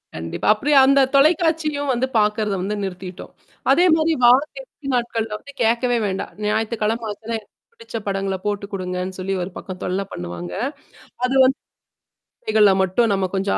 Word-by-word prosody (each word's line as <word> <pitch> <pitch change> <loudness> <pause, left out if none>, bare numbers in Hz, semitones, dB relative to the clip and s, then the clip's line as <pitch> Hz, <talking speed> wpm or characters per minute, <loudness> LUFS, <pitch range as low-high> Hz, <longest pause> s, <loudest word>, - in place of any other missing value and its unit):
கண்டிப்பா. 80 +1 -4
அப்டி 280 +8 -2
அந்த 275 0 +5
தொலைக்காட்சியும் 305 -2 +2
வந்து 250 +2 0
பார்க்கறத 210 -1 +1
வந்து 205 +3 -2
நிறுத்திட்டோம் 185 -1 -7 0.4
அதே 355 - +5
மாரி 320 0 +2
வார 245 +2 +8 0.2
இறுதி 405 - -12
நாட்கள்ல 230 -2 -1
வந்து 280 - -13
கேட்கவே 235 +2 +2
வேண்டாம் 190 -1 -3
ஞாயித்துக்கிழம 220 +1 -1
ஆச்சுனா 220 +3 -6
எனக்கு 210 - -23 0.2
பிடிச்ச 460 - -12
படங்கள 195 -1 -1
போட்டு 205 -1 -2
குடுங்கன்னு 185 0 -4
சொல்லி 195 +1 -2
ஒரு 185 - -6
பக்கம் 185 -1 -8
தொல்ல 185 +2 -1
பண்ணுவாங்க. 90 - -6 0.7
அது 255 +2 +1
வந்து 265 +2 +2 0.8
இசைகள்ல 215 -2 +4
மட்டும் 215 +5 +1
நம்ம 195 -1 0
கொஞ்சம் 195 +1 0
215 Hz, 150 wpm, -21 LUFS, 195-260 Hz, 0.8 s, வார